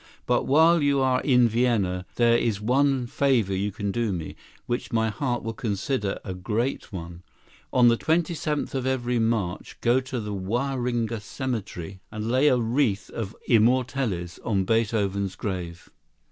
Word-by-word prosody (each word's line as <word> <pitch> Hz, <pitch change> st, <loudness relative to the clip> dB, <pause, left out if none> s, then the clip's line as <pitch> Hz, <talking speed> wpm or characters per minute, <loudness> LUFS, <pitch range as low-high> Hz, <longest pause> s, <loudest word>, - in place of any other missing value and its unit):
But 120 Hz, 0 st, +1 dB
while 160 Hz, +4 st, +5 dB
you 140 Hz, -1 st, +2 dB
are 130 Hz, -1 st, +2 dB
in 125 Hz, -4 st, +4 dB
Vienna, 105 Hz, -6 st, 0 dB
there 120 Hz, -1 st, +4 dB
is 115 Hz, -3 st, +1 dB
one 130 Hz, +3 st, +2 dB
favor 120 Hz, -6 st, +1 dB
you 100 Hz, +2 st, -1 dB
can 100 Hz, 0 st, -3 dB
do 115 Hz, 0 st, -1 dB
me, 85 Hz, -4 st, -5 dB, 0.3 s
which 120 Hz, +3 st, -3 dB
my 110 Hz, -1 st, +1 dB
heart 125 Hz, -1 st, -2 dB
will 115 Hz, -, -3 dB
consider 110 Hz, -2 st, -2 dB
a 95 Hz, -, -4 dB
great 110 Hz, +8 st, -2 dB
one. 85 Hz, -2 st, -7 dB, 0.5 s
On 125 Hz, -1 st, +5 dB
the 115 Hz, 0 st, +5 dB
twenty 165 Hz, +4 st, +1 dB
seventh 150 Hz, -1 st, -2 dB
of 130 Hz, -1 st, -1 dB
every 125 Hz, -2 st, 0 dB
March 110 Hz, -6 st, -1 dB
go 120 Hz, +2 st, +3 dB
to 130 Hz, -1 st, -4 dB
the 105 Hz, -2 st, -4 dB
Wahringer 120 Hz, +2 st, -1 dB
Cemetery 100 Hz, -, -5 dB
and 110 Hz, +1 st, -3 dB
lay 130 Hz, +4 st, +4 dB
a 130 Hz, -, +4 dB
wreath 115 Hz, -3 st, 0 dB
of 110 Hz, -2 st, -5 dB
immortelles 120 Hz, -6 st, +1 dB
on 100 Hz, -5 st, 0 dB
Beethoven's 100 Hz, -3 st, 0 dB
grave." 90 Hz, -3 st, -5 dB
115 Hz, 160 wpm, -25 LUFS, 100-130 Hz, 0.5 s, while